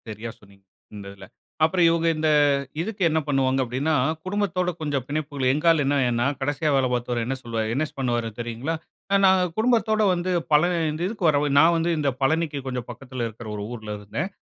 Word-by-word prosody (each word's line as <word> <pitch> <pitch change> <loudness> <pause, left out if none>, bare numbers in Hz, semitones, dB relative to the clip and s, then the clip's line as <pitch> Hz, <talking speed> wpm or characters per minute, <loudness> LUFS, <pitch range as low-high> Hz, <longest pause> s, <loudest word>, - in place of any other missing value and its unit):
சரியா 110 +2 -6
சொன்னீங்க, 100 -1 -21 0.3
இந்த 100 -1 -8
இதில. 95 -1 -12 0.4
அப்புறம் 170 +2 +3
இவுங்க 165 0 +1
இந்த 155 0 +1 0.5
இதுக்கு 205 +2 -5
என்னா 160 0 +1
பண்ணுவாங்க, 135 -2 +1
அப்டின்னா, 135 +6 -1 0.3
குடும்பத்தோட 185 -2 -1
கொஞ்சம் 145 -4 -1
பிணைப்புகள் 145 -3 -1
எங்க 150 +4 -3
ஆளு 160 -3 +2
என்னா 140 +1 +2
என்னா, 120 0 0 0.2
கடைசியா 145 +3 0
வேல 135 -1 +2
பாத்தவரு, 120 -1 -1
என்ன 135 +3 -2
சொல்வார், 115 -2 -3
என்ன 145 +5 0
பண்ணுவாரு 120 -3 -1
தெரியுங்களா? 120 +7 -3 0.4
அ - - +6
நாங்க 190 -1 +5
குடும்பத்தோட 220 -1 +2
வந்து 180 +1 -2 0.2
பழ 150 - +7 0.3
இந்த 155 +2 -6
இதுக்கு 200 -4 -1
வரவே 145 -1 +2
நான் 165 +3 +6
வந்து 165 +1 0
இந்த 145 -2 +1
பழனிக்கு 155 +1 +1
கொஞ்சம் 125 -3 -4
பக்கத்துல 125 0 -5
இருக்கு 110 -1 -8
ஒரு 100 - -4
ஊர்ல 110 -3 -7
இருந்தேன். 120 - -4
145 Hz, 185 wpm, -24 LUFS, 120-165 Hz, 0.5 s, பழ